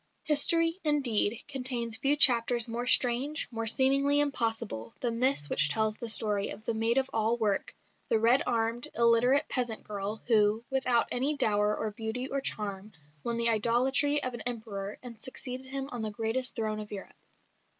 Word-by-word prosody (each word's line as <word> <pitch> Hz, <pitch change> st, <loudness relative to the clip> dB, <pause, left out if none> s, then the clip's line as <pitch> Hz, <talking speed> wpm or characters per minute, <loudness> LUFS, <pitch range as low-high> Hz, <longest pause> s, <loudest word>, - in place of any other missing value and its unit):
History, 330 Hz, +3 st, +2 dB
indeed, 245 Hz, -7 st, +2 dB
contains 250 Hz, -4 st, -2 dB
few 275 Hz, +5 st, +2 dB
chapters 240 Hz, -4 st, +5 dB
more 235 Hz, +2 st, -5 dB
strange, 255 Hz, +6 st, +1 dB
more 230 Hz, -1 st, -4 dB
seemingly 275 Hz, +4 st, +3 dB
impossible, 225 Hz, -, -2 dB
than 235 Hz, -2 st, -2 dB
this 255 Hz, -, +3 dB
which 145 Hz, 0 st, +2 dB
tells 215 Hz, +7 st, +2 dB
the 235 Hz, +1 st, -5 dB
story 210 Hz, -2 st, +1 dB
of 215 Hz, -, -9 dB
the 230 Hz, -, -1 dB
maid 225 Hz, +2 st, 0 dB
of 265 Hz, 0 st, +1 dB
all 225 Hz, +2 st, 0 dB
work 210 Hz, -4 st, -2 dB, 0.3 s
the -, -, +2 dB
red 235 Hz, +5 st, +3 dB
armed, 230 Hz, 0 st, -1 dB
illiterate 235 Hz, +4 st, +3 dB
peasant 240 Hz, -4 st, -2 dB
girl 205 Hz, +1 st, -6 dB
who, 220 Hz, 0 st, +2 dB
without 255 Hz, -3 st, +1 dB
any 275 Hz, +4 st, 0 dB
dower 210 Hz, -4 st, +1 dB
of 215 Hz, -2 st, -5 dB
beauty 225 Hz, +4 st, -4 dB
or 275 Hz, 0 st, -3 dB
charm, 205 Hz, -4 st, -3 dB, 0.3 s
won 235 Hz, 0 st, -3 dB
the 235 Hz, 0 st, +3 dB
idolatry 255 Hz, +6 st, +1 dB
of 255 Hz, -, -3 dB
an 240 Hz, -, -6 dB
Emperor 215 Hz, -4 st, -6 dB
and 235 Hz, -3 st, -11 dB
succeeded 260 Hz, 0 st, -6 dB
him 270 Hz, 0 st, -5 dB
on 245 Hz, -, -5 dB
the 220 Hz, -, -3 dB
greatest 225 Hz, +4 st, -2 dB
throne 215 Hz, -2 st, -3 dB
of 210 Hz, -1 st, -9 dB
Europe. 200 Hz, -2 st, -9 dB
235 Hz, 170 wpm, -28 LUFS, 220-260 Hz, 0.3 s, chapters